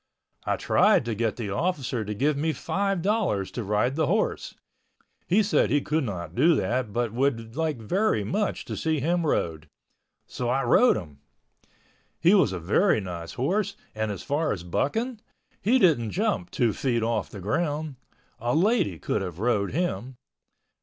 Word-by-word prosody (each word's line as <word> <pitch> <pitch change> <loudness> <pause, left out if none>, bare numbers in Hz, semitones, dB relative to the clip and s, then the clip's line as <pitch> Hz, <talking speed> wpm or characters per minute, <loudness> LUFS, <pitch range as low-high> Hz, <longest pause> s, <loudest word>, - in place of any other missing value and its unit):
I - - +2
tried - - +3
to 115 - -2
get 110 0 -1
the 110 -5 -4
officer 135 - -1
to 105 0 -4
give 145 +7 +1
me 155 +3 0
five 195 -1 -1
dollars 195 - 0
to 120 - -4
ride 105 +6 0
the 155 -1 +1
horse. 210 +5 -1 0.7
He 205 +5 +4
said 205 - +2
he 145 - +3
could 150 +2 -1
not 95 -8 -5
do 155 +7 +4
that 120 +1 -1
but 120 0 -1
would 115 -3 -1
like 160 -3 -1
very 150 - 0
much 205 - -2
to - - -5
see 160 -2 0
him 170 +3 0
rode. 80 - -1 0.6
So 120 -1 -4
I 135 +2 +1
rode 240 - +5
him. 75 -7 -9 1.0
He 175 +4 +5
was 190 - +4
a 95 - -3
very 110 - +2
nice 85 -4 -6
horse 185 - -1 0.2
and 110 0 -2
as 100 - -6
far 155 +3 0
as 85 - -3
bucking, 220 - -2 0.4
he 235 +6 +3
didn't 150 - +3
jump 200 - -1
two 120 -6 +1
feet 120 +1 0
off 115 -2 -1
the 100 - -9
ground. 150 - -2 0.4
A 120 +4 0
lady 180 - +2
could 105 - -2
have 90 -4 -5
rode 105 -2 0
him. 130 - -2
130 Hz, 175 wpm, -26 LUFS, 105-170 Hz, 1.0 s, rode